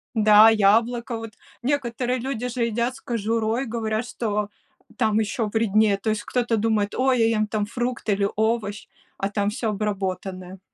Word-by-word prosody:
Да, 215 Hz, 0 st, +7 dB
яблоко, 230 Hz, +3 st, +2 dB
вот. 225 Hz, -1 st, -8 dB, 0.3 s
Некоторые 250 Hz, -2 st, -1 dB
люди 250 Hz, -1 st, -3 dB
же 240 Hz, -1 st, -1 dB
едят 235 Hz, +2 st, -1 dB
с -, -, -13 dB
кожурой, 230 Hz, +2 st, -1 dB
говорят, 225 Hz, -1 st, -2 dB
что 210 Hz, -4 st, -2 dB, 0.5 s
там 215 Hz, 0 st, +2 dB
еще 220 Hz, +1 st, -1 dB
вреднее. 215 Hz, -1 st, +2 dB
То 210 Hz, +3 st, -3 dB
есть, 215 Hz, -1 st, -1 dB
кто-то 240 Hz, -2 st, 0 dB
думает: 210 Hz, -1 st, 0 dB
"Ой, 255 Hz, -1 st, +2 dB
я 225 Hz, -, +4 dB
ем 215 Hz, -1 st, +1 dB
там 210 Hz, -1 st, -1 dB
фрукт 245 Hz, +3 st, -4 dB
или 200 Hz, -1 st, +2 dB
овощ, 220 Hz, -1 st, -1 dB, 0.3 s
а 195 Hz, -, -2 dB
там 205 Hz, 0 st, 0 dB
всё 225 Hz, +1 st, -2 dB
обработанное". 190 Hz, -3 st, -4 dB
220 Hz, 160 wpm, -24 LUFS, 210-235 Hz, 0.5 s, Да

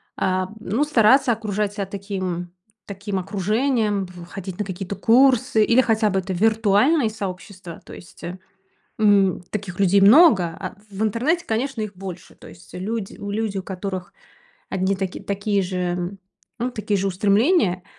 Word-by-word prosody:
А, 185 Hz, 0 st, -1 dB
ну 225 Hz, +6 st, 0 dB
стараться 255 Hz, -2 st, +4 dB
окружать 210 Hz, -2 st, -2 dB
себя 200 Hz, -2 st, -3 dB
таким 185 Hz, -3 st, -5 dB, 0.3 s
таким 200 Hz, -1 st, -4 dB
окружением, 210 Hz, +2 st, 0 dB
б 180 Hz, -, -13 dB, 0.2 s
ходить 190 Hz, -1 st, -7 dB
на -, -, +1 dB
какие-то 190 Hz, +1 st, -5 dB
курсы 255 Hz, -1 st, +4 dB
или 235 Hz, +4 st, +4 dB
хотя 220 Hz, -3 st, +2 dB
бы 195 Hz, 0 st, 0 dB
это 190 Hz, +1 st, -5 dB
виртуальные 220 Hz, -, +3 dB
сообщества. 185 Hz, -4 st, -7 dB
То -, -, -13 dB
есть, 175 Hz, -, -14 dB
э, 180 Hz, +2 st, -6 dB, 0.6 s
м, 200 Hz, -4 st, +3 dB
таких 195 Hz, -4 st, -5 dB
людей 200 Hz, 0 st, +4 dB
много, 210 Hz, -, +7 dB
а 185 Hz, -3 st, -6 dB, 0.2 s
в 200 Hz, +2 st, -2 dB
интернете, 275 Hz, -, 0 dB
конечно, 235 Hz, +2 st, -2 dB
их 210 Hz, -2 st, -5 dB
больше. 185 Hz, -1 st, -9 dB
То -, -, -14 dB
есть 175 Hz, -, -16 dB
люди 200 Hz, +2 st, -4 dB
у 200 Hz, -, -6 dB
люди, 210 Hz, -2 st, -2 dB
у -, -, -4 dB
которых 185 Hz, -1 st, -5 dB, 0.6 s
одни 190 Hz, +1 st, 0 dB
таки 190 Hz, -1 st, -4 dB
такие 200 Hz, 0 st, -1 dB
же, 180 Hz, 0 st, -3 dB, 0.4 s
ну 250 Hz, +1 st, -1 dB
такие 210 Hz, -3 st, -1 dB
же 195 Hz, +1 st, 0 dB
устремления, 200 Hz, -, +2 dB
200 Hz, 155 wpm, -22 LUFS, 185-220 Hz, 0.6 s, много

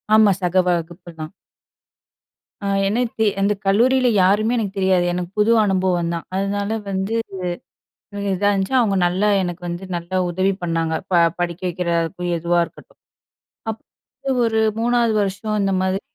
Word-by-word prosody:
ஆமா, 215 Hz, -2 st, +6 dB
சக 180 Hz, +1 st, -1 dB
வகுப்பு 175 Hz, 0 st, -2 dB
தான். 155 Hz, +1 st, -6 dB, 1.3 s
அ -, -, -1 dB, 0.2 s
எனக்கு 225 Hz, +1 st, 0 dB
அந்த 200 Hz, +1 st, +2 dB
கல்லூரில 250 Hz, +6 st, +3 dB, 0.2 s
யாருமே 215 Hz, +5 st, +3 dB
எனக்கு 205 Hz, -3 st, -2 dB
தெரியாது. 190 Hz, -2 st, +2 dB
எனக்கு 180 Hz, 0 st, -4 dB
புது 215 Hz, +2 st, +4 dB
அனுபவம் 185 Hz, -3 st, +1 dB
தான். 170 Hz, -, -5 dB
அதனால 200 Hz, +1 st, -1 dB, 0.2 s
வந்து 195 Hz, +3 st, -2 dB, 1.0 s
இது 200 Hz, -, -5 dB
இதா 205 Hz, +2 st, +1 dB
இருந்துச்சு. 195 Hz, +5 st, 0 dB
அவுங்க 205 Hz, -5 st, +2 dB
நல்லா 190 Hz, +4 st, 0 dB
எனக்கு 175 Hz, -1 st, -4 dB
வந்து 175 Hz, +2 st, -5 dB
நல்லா 170 Hz, +2 st, -5 dB
உதவி 190 Hz, +3 st, +1 dB
பண்ணாங்க, 165 Hz, -1 st, -1 dB, 0.2 s
ப -, -, 0 dB, 0.3 s
படிக்க 175 Hz, 0 st, -2 dB
வைக்கிறதாருக்கும், 175 Hz, 0 st, -1 dB
எதுவா 170 Hz, +1 st, +1 dB
இருக்கட்டும். -, -, -18 dB, 0.7 s
அப்ப 265 Hz, +4 st, -7 dB
ஒரு 220 Hz, 0 st, +1 dB, 0.2 s
3ஆவது 235 Hz, -1 st, +2 dB
வருஷம் 200 Hz, +2 st, -2 dB
இந்த 195 Hz, -, +1 dB
மாதிரி 190 Hz, +1 st, 0 dB
190 Hz, 140 wpm, -21 LUFS, 175-210 Hz, 1.3 s, ஆமா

